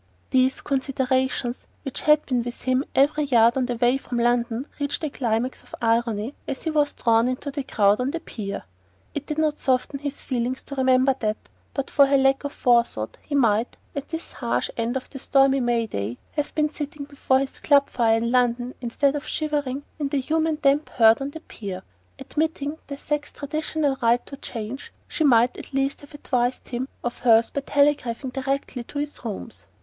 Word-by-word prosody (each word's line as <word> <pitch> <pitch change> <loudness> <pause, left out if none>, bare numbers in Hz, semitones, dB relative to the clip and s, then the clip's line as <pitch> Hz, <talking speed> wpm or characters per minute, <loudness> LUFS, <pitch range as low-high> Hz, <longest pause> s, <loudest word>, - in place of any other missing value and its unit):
These 260 0 +3
considerations, 260 -2 -1 0.2
which 270 -3 -4
had 300 0 +4
been 250 -3 +1
with 240 +1 -6
him 255 +1 +2
every 290 +2 +3
yard 235 -3 +5
of 260 -2 +1
the 245 - -1
way 245 +3 +2
from 245 -2 -4
London, 240 +1 +1
reached 285 +2 -2
a 305 - -1
climax 240 0 -1
of - - -11
irony 230 0 +1
as 265 - -4
he 320 - -1
was 295 -1 +2
drawn 230 0 +3
into 255 +3 -3
the 285 +1 -3
crowd 205 -5 +3
on 250 +1 0
the 335 - -3
pier. 205 -10 -6 0.5
It 290 0 -5
did 300 - -3
not 310 -1 +1
soften 260 +1 0
his 285 0 -4
feelings 255 0 -2
to - - -8
remember 260 0 +4
that, 215 -1 0 0.4
but 275 -1 -3
for 280 -1 +6
her 275 0 +4
lack 270 +1 +3
of 285 - -3
forethought, 235 - +1
he 290 - -2
might, 230 -3 +2 0.2
at 280 0 -5
this 325 0 -5
harsh 235 -3 -1
end 235 +2 -1
of 260 - -7
the 270 - -7
stormy 270 0 +4
May 240 -2 +1
day, 115 - -4
have 295 -1 -3
been 305 -1 +2
sitting 295 -1 -5
before 280 -2 +1
his 270 0 -3
club 280 -2 +4
fire 225 -2 +2
in 235 +1 -1
London 245 0 +1
instead 275 +4 +1
of 290 +1 -4
shivering 290 -3 -2 0.2
in 290 - 0
the 275 -2 0 0.4
damp 280 +2 +3
human - - -18
herd 225 +1 +6
on 275 - -2
the 320 +2 -9
pier. 195 - -7 0.3
Admitting 305 -1 -2
the 280 - -6
sex's 295 +1 -3
traditional 305 -1 -1
right 235 +1 +3
to 275 - -8
change, 235 +1 -6 0.2
she 315 - -1
might 245 -3 +5
at - - -9
least 275 +1 0
have 285 0 -13
advised 250 -3 -1
him 250 +1 -3 0.2
of 240 - -3
hers 230 -2 +4
by 280 - -2
telegraphing 280 -3 +1
directly 270 -1 -2
to 285 - -8
his 290 -2 -4
rooms. 225 +1 -7
260 Hz, 195 wpm, -24 LUFS, 240-285 Hz, 0.5 s, for